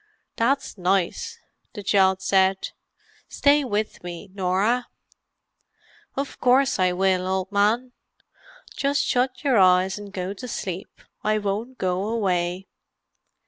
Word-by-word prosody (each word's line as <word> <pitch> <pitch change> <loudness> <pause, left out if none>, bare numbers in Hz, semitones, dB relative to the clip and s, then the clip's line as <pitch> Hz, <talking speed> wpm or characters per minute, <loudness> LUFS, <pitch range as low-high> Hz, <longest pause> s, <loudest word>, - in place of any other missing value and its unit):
"That's 255 -2 0
nice!" 195 - 0 0.4
the 205 - -6
child 190 -1 +3
said. 190 0 +2 0.6
"Stay 290 +1 +3
with 215 -6 -3
me, 175 +2 -8
Norah." 200 +6 +1 1.3
"Of 275 0 -4
course 260 -1 +3
I 185 -1 +3
will, 185 0 +1
old 190 0 -2
man. 215 +5 +2 0.8
Just 280 +1 +1
shut 255 +2 0
your 265 -7 +3
eyes 185 +1 +4
and 205 -1 -9
go 185 0 -4
to 250 +5 -8
sleep; 190 -5 -6 0.2
I 215 0 +2
won't 215 +5 -3
go 185 +2 -1
away." 185 -4 -1
200 Hz, 120 wpm, -24 LUFS, 185-245 Hz, 1.3 s, eyes